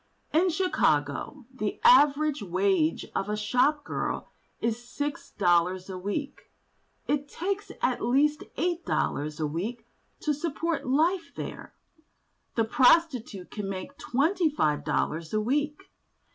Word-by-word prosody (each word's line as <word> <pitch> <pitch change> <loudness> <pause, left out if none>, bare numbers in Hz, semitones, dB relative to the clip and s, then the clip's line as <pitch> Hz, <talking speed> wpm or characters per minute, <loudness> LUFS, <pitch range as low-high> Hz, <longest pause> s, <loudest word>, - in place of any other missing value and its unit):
In 350 +4 +4
Chicago 270 - 0
the 215 -5 -3
average 300 - +5
wage 185 -3 +1
of 195 - -2
a 210 - -1
shop 255 +8 +2
girl - - -3 0.3
is 230 +1 -1
six 290 +4 -4
dollars 180 0 +1
a 185 - -5
week; 275 +10 -4 0.6
it 285 0 0
takes 395 +3 -3
at 250 - +1
least 285 +5 +2
eight 345 +1 0
dollars 150 +1 -1
a 155 - 0
week 210 +10 -4 0.4
to 300 - +1
support 320 0 -2
life 330 +6 +2
there; - - -7 0.8
the 225 - +3
prostitute 250 - +3
can 205 -2 -4
make 195 +8 -6
twenty 320 +7 +1
five 155 - 0
dollars 160 +5 -1
a - - +3
week. 295 - -1
255 Hz, 130 wpm, -28 LUFS, 195-305 Hz, 0.8 s, average